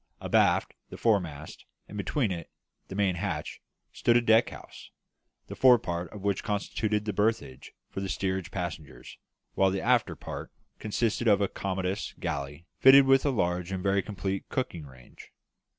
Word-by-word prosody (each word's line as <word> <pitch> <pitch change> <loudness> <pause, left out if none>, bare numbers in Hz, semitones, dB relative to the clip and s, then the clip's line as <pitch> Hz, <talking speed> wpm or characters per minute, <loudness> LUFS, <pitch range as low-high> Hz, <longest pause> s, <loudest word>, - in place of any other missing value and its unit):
Abaft - - +2 0.2
the - - -9
foremast, 85 -9 -1 0.2
and - - -11
between 105 +2 -1
it 85 -3 -5
and - - -52
the 95 - -6
main 100 -2 +2
hatch, 85 -5 -4 0.3
stood 120 0 +3
a - - +3
deck 115 0 +4
house, - - -12 0.6
the - - -8
fore 125 -2 +7
part 85 -5 -4
of 100 -2 -10
which 100 -2 0
constituted 105 0 -1
the 105 - -2
berthage 105 - -2
for 95 - -6
the 95 - -4
steerage 95 -2 -2
passengers, 80 -9 -7 0.3
while 95 - +3
the 95 +1 -1
after 120 +2 +2
part - - -8 0.3
consisted 115 +2 -1
of 100 -2 +5
a 100 - +1
commodious 95 +1 -3
galley 75 -1 -4
fitted 135 +1 +8
with 135 +1 +4
a - - +4
large 90 -6 -1
and 95 -1 -3
very 100 0 +2
complete 95 0 -4
cooking 85 - -3
range. 65 -2 -16
95 Hz, 165 wpm, -28 LUFS, 85-110 Hz, 0.6 s, fitted